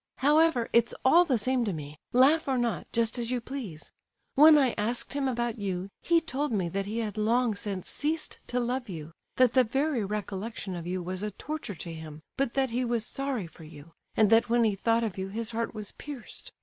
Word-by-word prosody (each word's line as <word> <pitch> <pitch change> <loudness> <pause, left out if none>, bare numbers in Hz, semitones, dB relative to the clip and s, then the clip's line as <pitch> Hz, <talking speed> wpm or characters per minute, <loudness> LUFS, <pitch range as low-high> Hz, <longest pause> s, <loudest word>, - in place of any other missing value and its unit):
"However, 295 -3 +4
it's 235 0 +3
all 340 +7 +7
the 265 -7 +2
same 255 +3 +1
to 205 -4 -1
me; 150 -2 -7 0.2
laugh 280 +6 +5
or 265 -1 +1
not, 240 -2 -1
just 230 +1 0
as 235 -1 -2
you 250 -1 0
please. 230 - -7 0.4
When 305 +2 +8
I 265 -4 +3
asked 230 +6 -2
him 280 -1 0
about 240 -2 -1
you, 190 -1 -3
he 340 -1 +4
told 295 -2 -3
me 190 -6 0
that 195 +3 -3
he 215 +3 -3
had 215 -2 -3
long 230 +2 +2
since 200 -2 -5
ceased 310 +2 -2
to 250 - -1
love 245 0 -2
you, 160 -3 -7 0.2
that 255 -2 +4
the 255 - +6
very 270 +1 0
recollection 205 0 -4
of 170 -1 -6
you 180 0 -2
was 185 +2 -4
a 210 - -2
torture 295 0 -6
to 170 0 -7
him, 155 -1 -9
but 270 -3 -1
that 265 -2 +1
he 245 +2 0
was 235 -2 0
sorry 270 -6 -3
for 165 0 -14
you; 155 0 -13 0.3
and 215 -1 +4
that 225 +1 +5
when 235 0 +4
he 215 -2 +3
thought 230 +4 +1
of 205 -4 -3
you 190 - -2
his 220 +3 -4
heart 230 0 -3
was 210 -2 -6
pierced. 280 -6 -8
230 Hz, 220 wpm, -28 LUFS, 195-260 Hz, 0.4 s, When